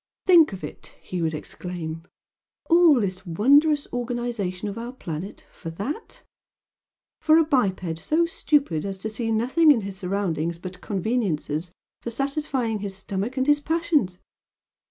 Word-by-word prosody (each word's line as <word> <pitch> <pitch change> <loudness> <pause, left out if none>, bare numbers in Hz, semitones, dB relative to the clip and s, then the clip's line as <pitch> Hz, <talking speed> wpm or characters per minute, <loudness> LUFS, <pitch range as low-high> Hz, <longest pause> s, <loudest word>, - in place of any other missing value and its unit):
"Think 340 -7 +7
of 190 -1 -8
it!" - - -9
he 180 -1 -5
would 160 -1 0
exclaim 165 0 -6 0.7
"All 335 -5 +7
this 190 -3 -2
wondrous 285 - +4
organisation 240 -6 -3
of 200 - -4
our 235 +2 -5
planet 175 -4 -7
for 165 - -8
THAT! 210 - -6 1.0
For 315 0 +5
a 330 - +6
biped 190 - 0
so 320 - +2
stupid 285 - +1
as 195 -1 -4
to 215 +3 -5
see 225 +1 -2
nothing 255 +9 +3
in 265 -7 +6
his 195 -1 -6
surroundings 180 -4 -2
but 180 +1 -9
conveniences 185 -6 -2 0.3
for - - -4
satisfying 270 -3 -1
his 200 -1 -5
stomach 200 +6 -4
and 260 - +2
his 295 0 +4
passions! 310 - 0
215 Hz, 145 wpm, -24 LUFS, 180-280 Hz, 1.0 s, Think